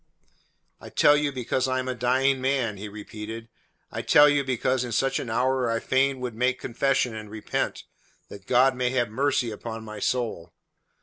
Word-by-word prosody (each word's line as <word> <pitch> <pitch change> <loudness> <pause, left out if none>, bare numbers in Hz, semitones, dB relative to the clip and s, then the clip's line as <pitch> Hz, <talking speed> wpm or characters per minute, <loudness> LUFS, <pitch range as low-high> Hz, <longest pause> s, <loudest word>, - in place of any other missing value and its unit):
"I - - -11
tell 145 - +5
you 145 -1 0
because 130 0 -1
I 130 0 0
am 130 0 -2
a 130 - -1
dying 130 +2 +1
man," 130 -5 0
he 105 +2 -7
repeated. 110 +2 -8 0.4
"I - - -4
tell 145 - +6
it 145 - +5
you 140 -1 +1
because 130 0 0
in 120 - -5
such 135 +4 +1
an 125 - -5
hour 130 +2 +1
I 115 0 0
fain 135 +2 +1
would 125 -2 -4
make 125 +3 0
confession 125 -1 0
and 110 -1 -8
repent, 110 0 -3 0.4
that 100 -1 -12
God 130 +1 +4
may 125 -1 0
have 120 -3 0
mercy 130 0 0
upon 110 +1 -7
my 105 -1 -8
soul. 115 -9 -2
125 Hz, 190 wpm, -25 LUFS, 115-130 Hz, 0.4 s, tell